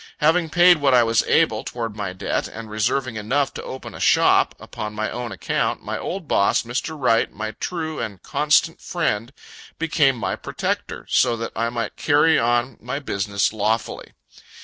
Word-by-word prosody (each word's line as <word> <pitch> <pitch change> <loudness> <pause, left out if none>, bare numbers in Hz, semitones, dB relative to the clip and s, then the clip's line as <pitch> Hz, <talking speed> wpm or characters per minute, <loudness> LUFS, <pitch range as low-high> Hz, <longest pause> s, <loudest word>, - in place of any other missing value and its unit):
Having 160 +2 +2
paid 175 +1 +6
what 140 -3 +3
I 120 - +6
was 115 -1 +3
able, - - +2
toward 115 -3 -5
my 100 -3 -4
debt, 95 - -2
and 110 -1 -9
reserving 115 +3 -1
enough 135 +6 0
to - - -6
open 130 - -8
a - - -9
shop, - - +4
upon 105 0 -7
my 110 +1 -2
own 120 -1 -5
account, - - -2
my - - -4
old 185 -3 -5
boss, 100 - +2
Mr. 130 +7 -4
Wright, 115 -4 +2
my 110 +1 -5
true 160 - -4
and 105 -5 -5
constant 150 +2 +2
friend, 120 -9 -2 0.5
became 150 -4 +2
my 115 - -2
protector, - - -4
so 120 - +2
that 115 0 -4
I 115 +1 0
might 115 -2 -4
carry 150 +2 +4
on 120 +1 +1
my 125 +4 -4
business 100 -7 -1
lawfully. 110 +1 -2
120 Hz, 170 wpm, -22 LUFS, 110-150 Hz, 0.5 s, paid